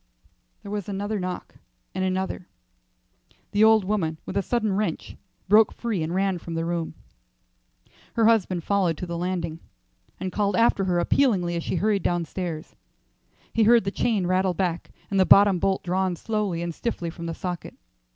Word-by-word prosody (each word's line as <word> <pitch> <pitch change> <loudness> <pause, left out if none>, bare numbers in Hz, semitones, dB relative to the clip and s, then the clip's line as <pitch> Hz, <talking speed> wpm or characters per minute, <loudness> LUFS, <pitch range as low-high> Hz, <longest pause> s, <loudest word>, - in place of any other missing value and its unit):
There 200 - -8
was 205 -2 -4
another 205 +2 -2
knock, 180 -1 -5 0.4
and 185 - -2
another. 185 -1 -2 1.0
The 210 +1 +3
old 220 -2 +6
woman 180 -6 -1
with - - -6
a - - +2
sudden 220 -1 0
wrench 195 -4 -2 0.3
broke 210 +2 +6
free 225 -7 -3
and 160 +3 -2
ran 190 -2 +1
from 170 0 -7
the 165 0 -1
room. 170 -1 -3 1.2
Her 230 - +3
husband 190 -6 +2
followed 185 -5 +1
to - - -4
the 170 -1 -5
landing, 170 -2 -3 0.6
and 185 - -3
called 205 0 0
after 230 -4 +3
her 180 -2 +1
appealingly 175 -2 +2
as 170 - -2
she - - -2
hurried 205 +2 +1
downstairs. 175 -1 -3 0.8
He 230 - +2
heard 230 +1 +6
the 195 - -2
chain 210 -4 0
rattle 185 0 +1
back 175 -2 -2 0.2
and 195 - +2
the - - +7
bottom 200 -1 +6
bolt 190 +2 0
drawn 185 0 0
slowly 205 -4 -2
and 170 -1 -3
stiffly 175 -4 -3
from 170 0 -7
the 165 - -4
socket. 175 -4 -5
190 Hz, 170 wpm, -25 LUFS, 175-205 Hz, 1.2 s, the